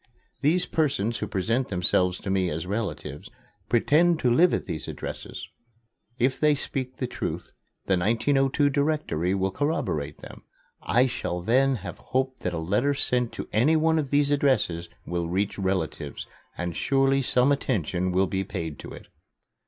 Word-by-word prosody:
These 170 +5 +2
persons 135 -8 0
who - - -3
present 115 +7 0
themselves 90 0 +2
to 95 - -3
me 95 -2 +1
as 80 +1 -3
relatives 85 -8 -4 0.4
pretend 155 +8 +3
to 120 -2 +3
live 175 +7 +5
at - - -1
these 85 -4 -5
addresses. - - -6 0.7
If 130 +2 +1
they 150 -1 +4
speak 130 -2 -4
the 130 - -2
truth, - - -5 0.3
the 95 -2 +2
1902 135 +7 +2
Directory 140 - 0
will 95 0 0
corroborate 95 - -2
them. - - -11 0.4
I 125 +2 +3
shall 90 -8 -3
then 130 +6 +3
have - - -7
hope 130 0 -2
that 90 - -2
a 85 - -3
letter 105 +13 +1
sent 125 -3 +1
to - - -6
any 130 +9 +4
one 160 0 +3
of 140 -3 -2
these 145 0 +3
addresses 130 -12 +1 0.2
will 85 -1 -2
reach 100 +3 -1
relatives 95 -5 -2 0.3
and 90 -2 -3
surely 135 0 +2
some 125 +1 +3
attention 90 - 0
will 95 +2 +3
be 95 0 -2
paid 85 -7 -5
to - - -8
it." - - -12
120 Hz, 160 wpm, -26 LUFS, 90-140 Hz, 0.7 s, live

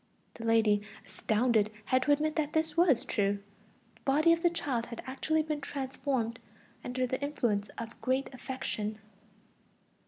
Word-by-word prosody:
The 230 - -8
lady, 220 -2 +4 0.2
astounded, 220 -1 +2 0.2
had 255 0 +3
to 290 - +2
admit 305 +2 +2
that 305 -2 0
this 320 0 +1
was 335 -8 +4
true; 205 -3 +1 0.6
the - - -26
body 305 +5 +4
of 335 - 0
the 345 - +5
child 275 -9 -2
had 235 - -7
actually 310 +4 0
been 305 -1 -3
transformed 265 -4 -2 0.4
under 255 +1 -1
the 260 +2 -2
influence 235 -8 0
of 230 0 -5
a - - -17
great 260 +1 0
affection. 220 -5 -4
260 Hz, 155 wpm, -31 LUFS, 230-295 Hz, 0.6 s, the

